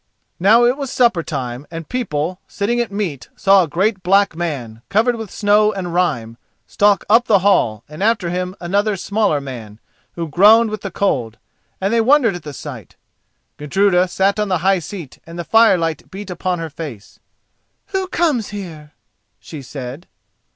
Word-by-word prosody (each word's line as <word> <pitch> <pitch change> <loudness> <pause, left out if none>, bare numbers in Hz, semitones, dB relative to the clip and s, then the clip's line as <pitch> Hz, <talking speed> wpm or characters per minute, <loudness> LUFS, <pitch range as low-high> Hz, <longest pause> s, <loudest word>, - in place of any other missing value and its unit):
Now 220 +6 +5
it 245 +3 +2
was 280 -3 -4
supper 235 -9 +3
time, 135 -4 -5
and 165 -1 -7
people, 180 -7 -3
sitting 235 +3 -1
at 235 -4 -1
meat, 175 - -4
saw 195 0 +5
a 175 - 0
great 190 +5 0
black 195 0 +3
man, 135 -10 -4
covered 230 +4 +2
with 225 -3 -7
snow 210 +1 +3
and 185 -4 -5
rime, 120 -11 -1 0.3
stalk 205 -1 +2
up 230 +3 +5
the 205 - +5
hall, 110 - +2
and 150 +3 -10
after 205 -5 +1
him 180 +1 -3
another 200 +4 0
smaller 200 -5 0
man, 115 -6 -9 0.3
who 170 -1 -4
groaned 215 +7 +5
with 215 - -5
the 195 - -4
cold, 125 - -1 0.4
and 195 +3 -1
they 230 - +3
wondered 250 -2 +4
at 175 - -7
the 150 - -8
sight. 130 - -9 0.6
Gudruda 180 +4 +2
sat 195 +3 +1
on 210 - 0
the 185 -2 +1
high 195 -1 +4
seat 175 -5 -9
and 165 +1 -9
the 175 - -3
firelight 170 -7 +2
beat 195 0 -8
upon 180 +1 -2
her 165 -2 -5
face. 140 -10 -9 0.7
"Who 380 -1 -2
comes 310 - 0
here?" 165 -7 -8 0.5
she 155 -3 -9
said. 135 +4 -8
185 Hz, 170 wpm, -18 LUFS, 155-210 Hz, 0.7 s, Now